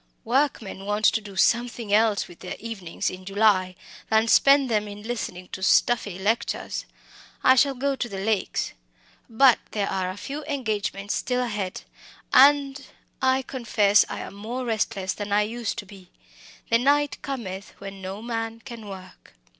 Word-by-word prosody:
Workmen 235 -6 0
want 210 +1 0
to 220 - +4
do 200 -2 -11
something 235 0 +1
else 215 -1 +3
with 175 - -15
their 180 - -6
evenings 205 -7 -4
in 185 0 -9
July 195 -2 +2 0.3
than 220 +1 +3
spend 275 +3 +5
them 215 -3 0
in 205 0 -9
listening 210 -6 -5
to 190 - -7
stuffy 205 -1 +2
lectures. 210 +5 -1 0.6
I 260 - +7
shall 270 +1 +3
go 275 +2 0
to 240 - -3
the 195 - -6
Lakes. 205 +1 -1 0.6
But 245 +1 +5
there 205 -2 0
are 185 -1 -1
a 185 - -6
few 285 +7 -6
engagements 215 -7 -2
still 250 0 -1
ahead, 205 -6 -3 0.5
and 280 0 +5 0.4
I 260 0 +2
confess 215 -6 +3
I - - -5
am - - -8
more 230 +6 -5
restless 215 -4 -1
than 205 -1 -6
I 205 +1 +4
used 225 +1 -4
to 220 - -5
be. 190 -2 -14 0.6
The 230 - +5
night 285 +3 +2
cometh 200 -8 -6
when 195 -1 -9
no 190 +3 -6
man 225 -1 -3
can 230 -4 -9
work." 185 - -12
220 Hz, 160 wpm, -25 LUFS, 195-245 Hz, 0.6 s, I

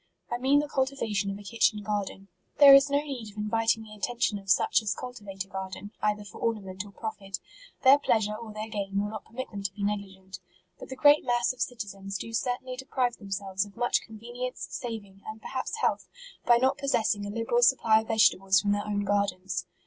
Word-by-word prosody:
I 240 - -1
mean 270 +3 +4
the 295 - -4
cultivation 260 -8 -1
of 195 - -4
a 205 - -11
kitchen 210 0 +1
garden. 200 -1 -3 0.3
There 280 -1 +10
is 275 +1 +7
no 280 - +2
need 255 -7 -6
of 210 - -17
inviting 225 +1 +1
the 215 -1 -12
attention 215 -1 -1
of 195 -1 -13
such 185 - +4
as 215 -2 -1
cultivate 205 -6 -7
a - - -24
garden, 190 +1 -6
either 210 0 0
for 195 - -11
ornament 195 -4 -2
or 205 - -13
profit; 195 -3 -5 0.5
their 275 +2 +8
pleasure 215 -6 +1
or 225 0 -8
their 215 +1 -5
gain 200 -2 -2
will 205 +1 -2
not 215 -2 -7
permit 260 +3 -7
them 200 -2 -6
to 195 -1 -2
be 200 +1 -7
negligent. 190 -2 -4 0.4
But - - -10
the 265 - -5
great 290 +2 +6
mass 240 0 +1
of 255 - -11
citizens 195 -4 -4
do 230 +5 -7
certainly 250 +2 -2
deprive 255 -2 -1
them 200 -3 -11
selves 195 -1 -1
of 205 +1 -13
much 240 0 +2
convenience, 240 +3 -6
saving, 205 -5 -6
and 220 0 -7
perhaps 260 - -4
health, - - +1 0.4
by 240 -1 +7
not 260 +2 +2
possessing 220 -7 0
a - - -5
liberal 230 +3 0
supply 230 -3 +5
of 220 - -12
vegetables 195 -3 +4
from 205 0 0
their 205 +1 -1
own 205 -1 0
gardens. 200 -2 -1
215 Hz, 210 wpm, -28 LUFS, 200-240 Hz, 0.5 s, There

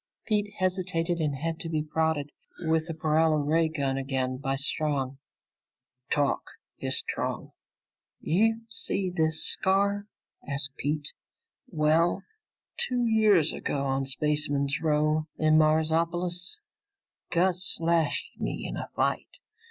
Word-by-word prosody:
Pete 210 -2 0
hesitated 180 -2 0
and 150 -3 0
had 160 +4 -3
to 165 - -5
be 155 -2 -1
prodded 155 -2 -1 0.3
with 160 -1 +1
the 165 - -4
paralo 155 0 +2
ray 165 +1 +3
gun 140 -4 -1
again 130 -1 -2
by 135 0 -2
Strong. 140 -1 0 0.9
"Talk!" 145 -2 +1 0.4
hissed - - +3
Strong. - - -4 0.7
"You 225 +6 +2
see 195 -4 -1
this 160 -1 +1
scar?" 200 +1 +1 0.4
asked 140 -1 +2
Pete. 145 +2 -2 0.6
"Well, 155 +3 +2 0.5
two 245 -2 0
years 215 -8 +4
ago, 140 -1 -2
on 135 0 -1
Spaceman's 145 0 0
Row 155 0 +1
in 155 0 +4
Marsopolis, 170 - +1 0.7
Gus 180 +1 +2
slashed 165 -4 0
me - - -3
in - - -5
a - - -5
fight. - - -1
160 Hz, 120 wpm, -27 LUFS, 145-175 Hz, 0.9 s, years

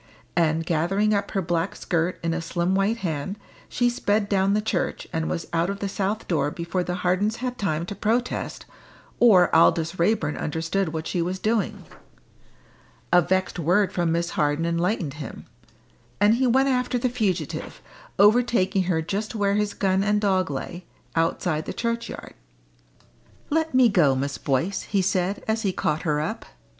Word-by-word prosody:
And, 165 -1 +2
gathering 195 +7 +1
up 200 0 0
her 195 -2 -1
black 170 +2 -1
skirt 175 0 -1
in 165 0 0
a 170 - -2
slim 175 +2 -1
white 195 +4 +1
hand, 160 +5 -3 0.3
she 245 - +1
sped 210 -3 0
down 195 0 +2
the - - +2
church, 210 -4 -2
and 160 0 -1
was 170 - -3
out 170 +2 +1
of 200 - -3
the 200 - -3
south 200 +2 -2
door 160 -4 +1
before 170 +3 -3
the 180 0 -3
Hardens 200 +5 +2
had 250 +1 -4
time 170 -4 -1
to 190 - -5
protest, 230 +5 -2 0.5
or 190 -9 +6
Aldous 165 +1 +3
Raeburn 195 -3 +1
understood 165 +4 -1
what 160 0 -4
she 175 - -1
was 180 +2 -2
doing. 215 +1 -1 1.3
A 175 - +7
vexed 185 +1 -1
word 180 +5 +2
from 175 -2 0
Miss 170 +1 -1
Harden 150 +2 0
enlightened 170 -2 -1
him, 140 - -8 0.7
and 205 +2 +5
he 255 +2 +2
went 265 +3 +3
after 250 -1 0
the 245 - 0
fugitive, 195 - -2 0.4
overtaking 205 -3 +3
her 165 -3 0
just 205 +7 -3
where 200 -2 +1
his 210 0 0
gun 190 0 +1
and 210 0 +2
dog 190 -4 +1
lay, 170 +6 -5 0.3
outside 165 -1 0
the - - -4
churchyard. 235 0 -4 1.2
"Let 320 -2 0
me 255 -1 +7
go, 165 -11 +3
Miss 140 +2 -3
Boyce," 145 +8 0
he 200 -2 0
said, 190 +1 0
as 220 0 0
he 200 -4 0
caught 155 -3 -1
her 150 -3 0
up. 155 - -4
185 Hz, 170 wpm, -24 LUFS, 165-210 Hz, 1.3 s, A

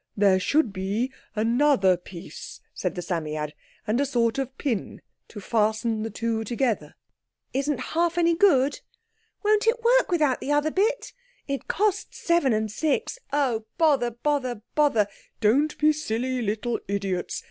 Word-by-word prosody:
"There 195 -2 +4
should 240 +3 +1
be 205 +7 -2 0.2
another 225 -3 +3
piece," 175 0 -10
said - - -3
the 180 - -4
Psammead, 155 -4 -3 0.3
"and 225 +4 +1
a - - +2
sort 235 -1 +1
of 265 -1 -4
pin 235 -8 -2 0.3
to 210 - -9
fasten 220 +1 0
the 225 - -3
two 225 +1 -2
together." 235 0 -1 0.6
"Isn't 280 +2 0
half 340 +1 0
any 340 -1 +4
good?"—"Won't 420 - 0
it 470 +1 +2
work - - +4
without 300 -7 +2
the 285 - -2
other 295 +1 +2
bit?"—"It 485 - -3
cost 415 0 0
seven 340 -6 +2
and 215 -1 0
six."—"Oh, 285 - -1
bother, 285 -8 +3
bother, 250 -2 -2
bother!"—"Don't 255 +1 +1
be 305 0 +4
silly 255 -3 -2
little 225 +2 -1
idiots!" 195 -2 -2
255 Hz, 135 wpm, -25 LUFS, 215-310 Hz, 0.6 s, There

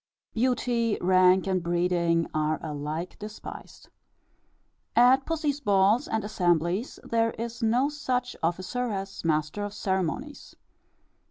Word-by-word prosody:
Beauty, 235 -2 +1
rank, 185 0 +4
and 190 -2 0
breeding 170 -1 +1
are 155 0 0
alike 155 +3 -5
despised. 210 +1 -10 1.1
At 255 +3 +5
pussy's 305 -3 -1
balls 205 +2 +3
and 220 -1 -1
assemblies, 180 - 0
there 230 0 +1
is 235 +1 -5
no 240 +4 +3
such 255 -4 -2
officer 185 +9 -1
as 195 -1 -5
master 155 +4 0
of 205 0 -5
ceremonies. 190 - -3
200 Hz, 110 wpm, -27 LUFS, 175-240 Hz, 1.1 s, At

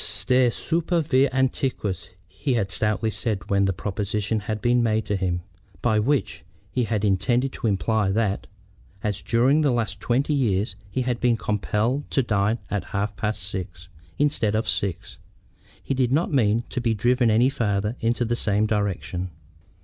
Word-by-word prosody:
"Stare 125 -1 +3
super 165 +6 0
vias 140 -3 +3
antiquas," 130 -8 -1 0.2
he 130 +7 -2
had 100 -4 0
stoutly 105 +3 0
said 110 -4 -3
when 100 0 +3
the 95 - +2
proposition 105 +3 -2
had 105 +1 -3
been 120 +2 +3
made 110 -2 +1
to 105 - -1
him; 90 -2 -1 0.4
by 110 -3 +2
which 135 +5 0 0.3
he 125 -2 0
had 105 -1 0
intended 120 +7 +1
to - - -2
imply 105 +1 +1
that, 100 0 0 0.6
as 105 -1 -1
during 130 +6 +3
the 150 - +3
last 115 -5 -1
twenty 130 +7 +1
years 105 -8 +1
he 125 +6 -1
had 125 -1 -1
been 120 -2 +2
compelled 110 +6 -1
to 135 - +2
dine 105 0 +1
at 100 -4 -1
half 100 +1 -1
past 105 -2 -2
six 90 -2 -6 0.3
instead 120 -7 +1
of 110 - 0
six, 95 -4 -2 0.6
he - - -1
did 130 -2 +1
not 155 +3 +1
mean 115 -3 +3
to 125 - -2
be 115 -2 +1
driven 120 +3 +2
any 115 +4 +4
farther 105 -3 -1
in 115 +1 +2
the 120 -1 -1
same 105 -2 +1
direction. 100 -4 -2
110 Hz, 170 wpm, -24 LUFS, 100-125 Hz, 0.6 s, any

